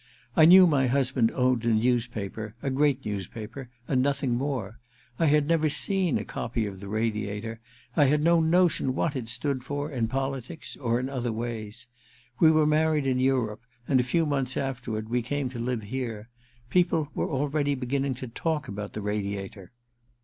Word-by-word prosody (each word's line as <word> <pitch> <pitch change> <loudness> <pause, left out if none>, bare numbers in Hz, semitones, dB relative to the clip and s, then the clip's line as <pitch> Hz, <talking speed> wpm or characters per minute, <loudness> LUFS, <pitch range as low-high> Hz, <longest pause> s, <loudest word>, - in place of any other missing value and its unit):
I 155 - +7
knew 185 +3 +9
my 140 -6 +3
husband 130 -2 +2
owned 125 -2 +2
a - - -1
newspaper 110 -2 0
— - - -32
a 135 - -1
great 140 0 +1
news 100 -3 -3
paper 120 +3 -8
— 120 - -35
and 130 -3 +2
nothing 135 -2 +1
more. 125 -5 -3 0.4
I 165 - +3
had 150 0 +3
never 160 -1 +2
seen 185 0 +1
a - - -4
copy 115 -1 -3
of 100 -2 -6
the 100 - -8
Radiator; 110 +1 -2 0.4
I 145 - +5
had 150 +2 +2
no 170 +1 +5
notion 160 -5 +2
what 155 0 0
it 120 -4 -4
stood 130 +2 -1
for, 145 +3 -4
in 120 -5 -1
politics— 135 +4 -4
or 120 -3 0
in 130 - -2
other 125 -3 -2
ways. 110 -2 -5 0.5
We 160 - +7
were 155 -1 +4
married 155 -1 +2
in 130 -1 +1
Europe, 130 -5 +1 0.3
and 130 - +3
a - - +3
few 160 +7 +1
months 135 -4 -1
afterward 120 -5 -3
we 120 +2 0
came 135 +2 -2
to 125 -2 -7
live 120 -1 -2
here. 115 -1 -5 0.4
People 170 -4 +2
were - - -2
already 145 0 0
beginning 135 +1 -1
to 130 +1 -7
talk 150 +4 -2
about 105 -1 -6
the 105 - -5
Radiator. 100 -2 -4
130 Hz, 185 wpm, -27 LUFS, 115-145 Hz, 0.5 s, knew